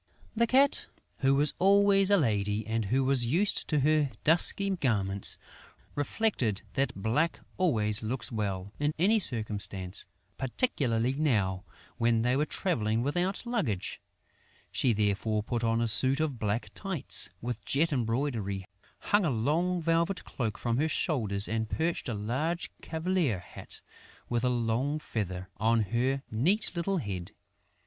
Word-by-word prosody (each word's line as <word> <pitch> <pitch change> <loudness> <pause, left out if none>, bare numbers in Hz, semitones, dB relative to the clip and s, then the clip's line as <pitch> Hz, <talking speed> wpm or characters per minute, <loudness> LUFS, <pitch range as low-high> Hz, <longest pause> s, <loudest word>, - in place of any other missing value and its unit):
The 235 +1 +2
Cat, 270 +3 +3 0.3
who 135 0 +3
was 145 +2 +2
always 195 0 +5
a 200 - +5
lady 105 - 0
and 110 0 -1
who 130 +7 +1
was 130 -3 +4
used 180 - +1
to 150 -3 +1
her 150 0 +2
dusky 175 +5 +5
garments, 100 - 0 0.6
reflected 145 - -1
that 135 0 0
black 135 +12 0 0.2
always 110 - +2
looks 115 +1 -2
well, 100 -3 -3
in 145 +1 0
any 205 +7 +4
circumstance, 105 - 0 0.3
particularly 130 - 0
now, 105 -10 0 0.3
when 115 -1 +2
they 125 +1 +2
were 150 +3 +1
travelling 115 - -1
without 180 - -1
luggage. 200 - -2 0.7
She 125 - +2
therefore 105 0 0
put 120 +1 -3
on 115 0 +1
a 115 - +1
suit 130 +5 +4
of 150 -6 -2
black 105 +2 -2
tights, 190 -8 -1
with 120 +1 -5
jet 155 +3 +2
embroidery, 115 -6 -2 0.3
hung 205 0 +1
a 170 - +1
long 160 +9 0
velvet 170 +3 0
cloak 110 -5 -4
from 120 -1 -1
her 155 +4 +1
shoulders 110 - 0
and 110 0 -2
perched 165 -4 -2
a 115 - -2
large 135 +12 -2
cavalier 160 - -1
hat, 90 - -9 0.5
with 120 0 -1
a 125 - +2
long 120 +4 0
feather, 95 - -4
on 115 +3 +2
her 130 +6 -1
neat 165 - +2
little 185 +3 0
head. 100 - -5
125 Hz, 145 wpm, -29 LUFS, 110-160 Hz, 0.7 s, always